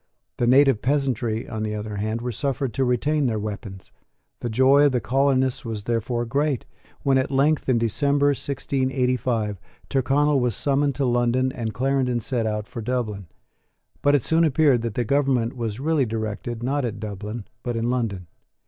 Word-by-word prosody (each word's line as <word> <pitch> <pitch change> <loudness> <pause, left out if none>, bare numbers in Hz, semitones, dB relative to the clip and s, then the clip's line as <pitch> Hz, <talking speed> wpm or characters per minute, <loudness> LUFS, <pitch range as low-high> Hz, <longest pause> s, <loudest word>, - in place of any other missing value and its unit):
The 120 - +1
native 135 -3 +5
peasantry, 125 -4 0
on 110 - -5
the 105 0 -2
other 105 0 -5
hand, 110 +3 -2
were 125 +1 -3
suffered 135 +2 -2
to 135 - 0
retain 135 +4 +1
their 110 -2 0
weapons. 105 -2 -6 0.5
The 120 - -3
joy 130 +5 +5
of 140 - +3
the 125 - +2
colonists 130 +3 +1
was 110 -3 -5
therefore 120 +1 -1
great, 140 +2 0 0.4
when 135 -1 +3
at 130 - -1
length, 140 +2 +2
in 125 - +4
December 140 +5 +2
1685, 130 -6 -1 0.3
Tyrconnel 140 +2 +2
was 125 -4 0
summoned 140 -1 +1
to 135 - 0
London 120 +1 +1
and 115 -4 -4
Clarendon 130 -1 +1
set 115 0 -1
out 105 -1 -3
for 115 - -7
Dublin. 110 -5 -3 0.7
But 145 0 +4
it 135 - +1
soon 165 +1 +3
appeared 145 -5 +3
that 115 -2 -4
the 120 - +1
government 130 -2 +1
was 115 -2 -4
really 150 -2 +1
directed, 110 +1 -4
not 140 +3 0
at 110 -3 -3
Dublin, 105 +1 -6 0.2
but 120 -1 -3
in 115 +1 0
London. 110 -8 -2
125 Hz, 175 wpm, -24 LUFS, 110-135 Hz, 0.7 s, native